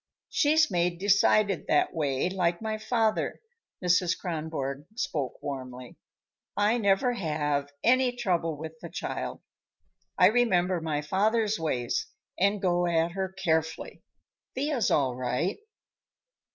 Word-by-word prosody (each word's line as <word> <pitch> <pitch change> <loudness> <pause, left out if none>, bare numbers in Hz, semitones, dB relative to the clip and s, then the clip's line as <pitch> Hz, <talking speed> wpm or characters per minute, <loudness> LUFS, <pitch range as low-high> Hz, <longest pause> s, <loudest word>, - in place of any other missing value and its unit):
She's 305 -2 +3
made 175 -1 +1
decided 200 0 +3
that 150 - +2
way, 140 -2 0
like 180 -2 0
my 220 -1 -3
father." 220 -1 0 0.5
Mrs. 180 0 +3
Kronborg 155 -5 -4
spoke 145 - -2
warmly. 130 -3 -6 0.6
"I 210 +4 +3
never 200 +4 +2
have 150 -7 -1
any 255 +1 +4
trouble 175 -9 -1
with 160 +1 -8
the 170 - -8
child. - - -5 0.8
I - - +7
remember 185 -7 +2
my 150 -2 -2
father's 215 +5 +1
ways 125 -7 -1 0.3
and 200 +2 +2
go 175 -2 +1
at 165 0 +1
her 190 +1 -3
carefully. 160 -4 -2 0.5
Thea's 270 -5 0
all 130 -4 +2
right." 130 +9 -1
175 Hz, 120 wpm, -28 LUFS, 155-210 Hz, 0.8 s, I